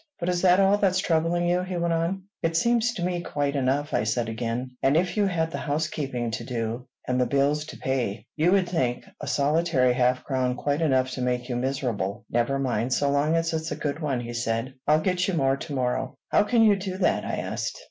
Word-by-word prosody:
But 175 - -1
is 175 -1 0
that 180 0 +5
all 195 +1 +4
that's 190 -2 +2
troubling 175 -1 +1
you?" 175 +1 +2
he 185 -1 -4
went 170 0 0
on. 170 +4 -1 0.2
"It 165 0 +1
seems 235 +4 +2
to 175 - -3
me 175 -1 -1
quite 145 -4 -2
enough," 140 +2 0
I - - +2
said 115 +1 -1
again; 115 +3 -3
"and 140 +3 +3
if 180 +1 0
you 205 -2 +2
had 165 -3 -1
the - - -4
housekeeping 145 -5 -2
to 115 - -4
do, 115 +1 -4 0.2
and 125 0 +1
the 125 - +2
bills 140 +3 +1
to - - -9
pay, 120 -6 -2
you 160 +3 +3
would 190 -2 +3
think 130 -9 -1
a - - -6
solitary 145 -3 +2
half 125 0 +2
crown 130 -2 0
quite 145 +4 -1
enough 130 -4 +2
to 130 - -4
make 125 0 -1
you 125 - -1
miserable." 120 -4 -2
"Never 120 +4 +1
mind 125 -2 0
so 140 +1 +1
long 145 +3 +2
as 165 0 0
it's 160 0 -2
a - - -1
good 145 +1 -3
one," 140 -6 -1
he 120 0 -6
said. 115 +1 -2
"I'll 155 +1 +4
get 180 +1 +1
you 190 - 0
more 135 -3 +2
to 145 - -7
morrow." 130 0 -1
"How - - +4
can 230 0 +4
you 210 -2 +5
do 190 -1 -4
that?" 190 - +1
I - - -2
asked. - - -3
145 Hz, 230 wpm, -26 LUFS, 125-175 Hz, 0.2 s, that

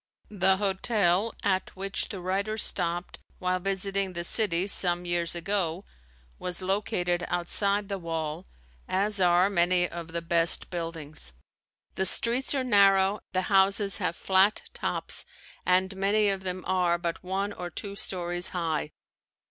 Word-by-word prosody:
The 190 -1 +2
hotel 200 0 +1
at 190 -1 0
which 195 +1 -3
the 195 - -6
writer 195 +4 -2
stopped 175 -4 -1 0.2
while 185 0 -1
visiting 195 0 -2
the 170 -1 -3
city 180 -2 +1
some 175 -3 +2
years 175 -1 0
ago, 175 0 -2 0.5
was 180 -1 -4
located 185 -3 0
outside 200 +3 0
the 195 -1 -4
wall, 165 0 -4 0.4
as 200 +2 0
are 180 +1 +4
many 175 -2 +2
of 170 -1 -7
the 170 0 -5
best 170 0 +2
buildings. 160 - -5 0.6
The 190 - +3
streets 240 +8 +4
are 265 - 0
narrow, 200 -3 +4
the 185 0 0
houses 195 +1 +4
have 180 -3 -2
flat 190 +3 +2
tops - - -1 0.4
and 185 +1 +2
many 205 +2 +2
of 195 -1 -1
them 185 -1 -4
are 180 -2 +1
but 170 0 -4
one 195 +2 -2
or 175 -2 -6
two 200 +3 -6
stories 175 -3 0
high. 160 -3 -1
185 Hz, 140 wpm, -27 LUFS, 175-200 Hz, 0.6 s, are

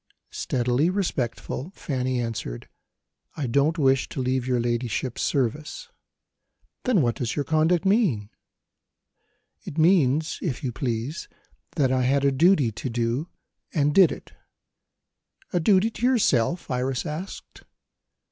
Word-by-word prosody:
Steadily 125 +5 0
respectful, 145 - -2
Fanny 130 -2 -2
answered: 110 - -4 0.7
"I 150 - -2
don't 140 +7 +2
wish 135 -3 +2
to - - -6
leave 130 0 -1
your 125 -1 +1
ladyship's 120 +1 -2
service." 150 - -2 1.0
"Then 230 - +3
what 120 -1 +1
does 120 -3 -2
your 145 - -1
conduct 160 +3 +2
mean?" 185 - +2 1.3
"It 145 - -8
means, 155 -3 +3
if 150 -7 -3
you 130 - -1
please, 120 +4 -3 0.5
that 135 -4 +2
I 130 -1 +2
had 135 +2 +2
a 140 - +4
duty 145 -3 +4
to 120 +5 -5
do 120 +7 -1 0.5
and 145 -1 +2
did 185 -3 +6
it." - - -9 1.2
"A 175 - +2
duty 195 +5 +3
to - - -11
yourself?" 175 - +1
Iris 125 0 -1
asked. 155 +6 -7
135 Hz, 130 wpm, -25 LUFS, 125-165 Hz, 1.3 s, did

